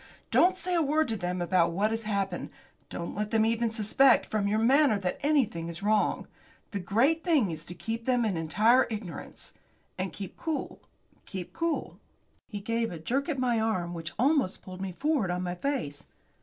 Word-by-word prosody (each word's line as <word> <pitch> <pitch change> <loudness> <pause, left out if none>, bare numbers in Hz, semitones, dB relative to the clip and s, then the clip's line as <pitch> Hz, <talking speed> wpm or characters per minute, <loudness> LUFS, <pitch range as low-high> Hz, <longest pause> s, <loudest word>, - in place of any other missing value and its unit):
Don't 370 +1 +5
say 365 0 -2
a 340 - +3
word 310 +1 +2
to 225 - 0
them 180 -2 -2
about 170 -1 +2
what 205 +5 +1
has 225 0 -1
happened. 195 -4 -2 0.4
Don't 170 - -5
let 210 +1 -2
them 220 -1 +3
even 230 +1 +1
suspect 225 +4 +4
from 210 -2 -1
your 210 +1 +1
manner 260 +1 +4
that 185 -2 -3
anything 255 - +1
is 170 +3 -6
wrong. 210 0 +1 0.5
The 200 - -2
great 235 - +2
thing 295 - +3
is 160 0 -5
to 175 - -7
keep 230 +3 -4
them 245 -2 +2
in 205 -4 0
entire 215 +11 +3
ignorance. 205 -6 -7 0.5
And 185 -1 -2
keep 195 +2 -8
cool 320 -3 -4 0.5
keep 185 -4 -6
cool." 335 -1 -2 0.5
He 205 -2 -6
gave 230 +2 -1
a 170 - -6
jerk 265 - -1
at 300 - -1
my 245 -3 +1
arm 185 -6 -1
which 165 -2 -5
almost 265 -4 +1
pulled 185 0 -9
me 195 -1 -3
forward 270 - 0
on 180 +1 -1
my 175 -1 -2
face. 180 - -3
215 Hz, 190 wpm, -28 LUFS, 180-260 Hz, 0.5 s, Don't